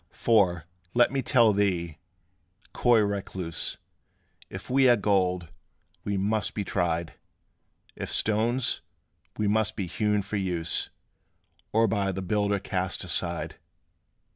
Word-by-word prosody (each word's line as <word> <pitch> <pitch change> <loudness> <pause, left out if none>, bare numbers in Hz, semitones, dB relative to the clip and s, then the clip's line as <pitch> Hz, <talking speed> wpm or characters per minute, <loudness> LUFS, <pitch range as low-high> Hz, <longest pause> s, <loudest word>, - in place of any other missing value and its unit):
For, 90 -8 +2 0.3
let 120 0 +4
me 135 0 0
tell 120 -6 +4
thee, 90 -5 -1 0.7
coy 120 -3 +4
recluse, 95 -5 -2 0.7
If - - -8
we 130 0 +4
are 120 - +7
gold, 90 -5 0 0.5
we 100 -1 -2
must 105 +3 -1
be 105 - -1
tried; 85 -3 -1 0.8
If - - -6
stones, 115 +4 +1 0.6
we 105 - 0
must 110 +1 +1
be 95 - -3
hewn 105 +3 0
for 100 +2 -4
use, 90 -4 -1 0.8
Or 115 +1 +3
by 100 -1 0
the 95 0 -5
builder 100 +1 +1
cast 95 -2 -2
aside. - - -2
100 Hz, 120 wpm, -27 LUFS, 90-110 Hz, 0.8 s, are